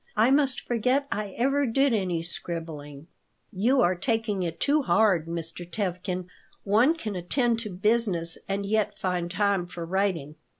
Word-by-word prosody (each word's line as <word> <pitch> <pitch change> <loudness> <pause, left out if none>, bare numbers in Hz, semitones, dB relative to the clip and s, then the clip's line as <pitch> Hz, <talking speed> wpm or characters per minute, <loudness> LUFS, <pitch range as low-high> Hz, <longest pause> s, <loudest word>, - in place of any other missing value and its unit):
I 225 +4 +4
must 275 -2 +3
forget 255 +4 0
I 205 -2 -3
ever 275 +3 +2
did 270 +3 +2
any 180 -6 -1
scribbling." 160 -4 -6 0.5
"You 245 +8 +2
are 180 - +3
taking 210 +1 -1
it 165 -2 -3
too 295 +2 +2
hard, 200 - +2
Mr. 165 +1 -5
Tevkin. 180 0 -3 0.4
One 225 +10 +4
can 215 -11 -5
attend 230 +6 0
to 225 -2 -5
business 195 -3 +2
and 200 +1 -1
yet 210 0 0
find 180 -2 -2
time 195 -1 0
for 175 -1 -7
writing." 175 -5 -1
195 Hz, 155 wpm, -26 LUFS, 175-230 Hz, 0.5 s, I